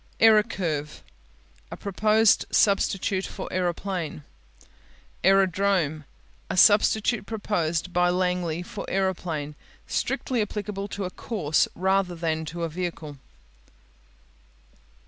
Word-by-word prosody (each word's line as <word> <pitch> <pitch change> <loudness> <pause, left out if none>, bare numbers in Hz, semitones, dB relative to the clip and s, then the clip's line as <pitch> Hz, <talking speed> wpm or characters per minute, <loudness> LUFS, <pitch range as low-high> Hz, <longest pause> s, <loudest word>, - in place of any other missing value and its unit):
Aerocurve 195 -9 +2 0.7
A - - -7
proposed 215 +2 +2
substitute 195 -1 +2
for - - -7
aeroplane. 175 -3 -2 1.0
Aerodrome 190 -5 +2 0.4
A - - -3
substitute 210 +2 +4
proposed 180 -6 -2
by 180 0 +3
Langley 180 -2 -1
for 200 - -7
aeroplane. 175 -6 -2 0.3
Strictly 250 -4 -1
applicable 205 -1 -4
to 200 -1 -5
a 180 - -5
course 165 -8 0
rather 190 0 +1
than 160 -1 -2
to 170 +2 -5
a - - 0
vehicle. 160 -4 -5
185 Hz, 95 wpm, -25 LUFS, 165-200 Hz, 1.0 s, substitute